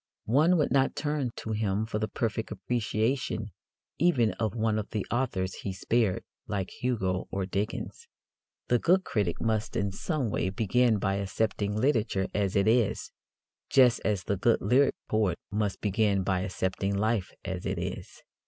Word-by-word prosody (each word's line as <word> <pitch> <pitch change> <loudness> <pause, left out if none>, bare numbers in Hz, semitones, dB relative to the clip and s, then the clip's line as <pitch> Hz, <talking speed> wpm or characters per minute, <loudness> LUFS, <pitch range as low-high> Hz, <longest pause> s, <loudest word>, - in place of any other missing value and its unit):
One 155 +10 +4
would 150 - +1
not 135 -1 +2
turn 145 -4 -1
to 110 - -5
him 105 -1 0
for 110 -1 -3
the 110 - -1
perfect 110 +1 -2
appreciation 110 +1 -1 0.5
even 130 -11 +3
of 110 0 -1
one 110 -1 +1
of 105 - -5
the 105 -3 -2
authors 110 -7 -1
he 100 - -3
spared, 105 0 +1 0.2
like 95 -2 -2
Hugo 95 -7 -1
or 95 -1 -2
Dickens. 105 - -4 0.6
The 120 - +3
good 185 +7 +3
critic 100 - -1
must 110 -1 -1
in 100 +1 0
some 130 - -2
way 95 - 0
begin 115 +3 +2
by 100 0 0
accepting 100 +1 -1
literature 110 -5 +1
as 100 -2 0
it 100 0 +3
is, 115 -1 +2 0.6
just 125 -3 +5
as 100 -4 0
the 100 - -1
good 115 +4 +3
lyric 125 +8 +3
poet 105 -6 +1
must 105 -1 -1
begin 100 -1 +2
by 95 -1 +1
accepting 95 +1 -1
life 110 -1 0 0.2
as 90 -1 -3
it - - -2
is. - - -6
110 Hz, 160 wpm, -29 LUFS, 100-120 Hz, 0.6 s, just